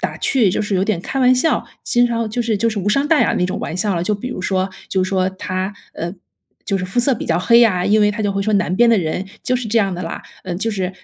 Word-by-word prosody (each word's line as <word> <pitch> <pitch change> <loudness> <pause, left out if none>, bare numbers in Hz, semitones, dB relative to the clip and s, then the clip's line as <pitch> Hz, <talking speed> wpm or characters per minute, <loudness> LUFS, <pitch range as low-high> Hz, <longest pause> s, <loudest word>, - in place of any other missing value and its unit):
打 - - -3
趣， 235 -8 +3
就 205 - -1
是 205 -1 -2
有 190 - +1
点 205 -6 -1
开 270 - -4
玩 255 0 +5
笑， 315 +6 +1 0.2
经 245 0 +3
常 230 -2 -1
就 240 - -2
是 225 -3 0
就 230 +3 +1
是 215 - -3
无 200 - -1
伤 275 +7 +2
大 320 - +4
雅 - - +2
那 180 - +1
种 185 - -2
玩 170 - -4
笑 200 +1 0
了， 170 - -1
就 210 - +1
比 225 +5 -5
如 250 - -5
说， 190 0 -1 0.2
就 190 - +1
说 185 -1 0
她， 190 +1 -4 0.2
呃， 170 +2 -4 0.5
就 195 -1 -1
是 180 - -3
肤 220 +7 -3
色 255 +1 +3
比 - - -6
较 165 0 +1
黑 235 +6 +5
呀， 185 -6 +3
因 215 +1 +3
为 210 0 +4
他 215 +1 -4
就 205 - 0
会 195 - -1
说： 215 0 0
“南 185 -2 +1
边 240 +4 +4
的 230 - +5
人 175 +3 -2 0.2
就 255 - 0
是 240 -3 -4
这 230 +2 +2
样 195 -3 +1
的 180 - -5
啦。” 165 - -5 0.2
呃， 175 - -4
就 225 +5 -1
是 190 -3 -2
205 Hz, 320 characters per minute, -19 LUFS, 185-230 Hz, 0.5 s, 玩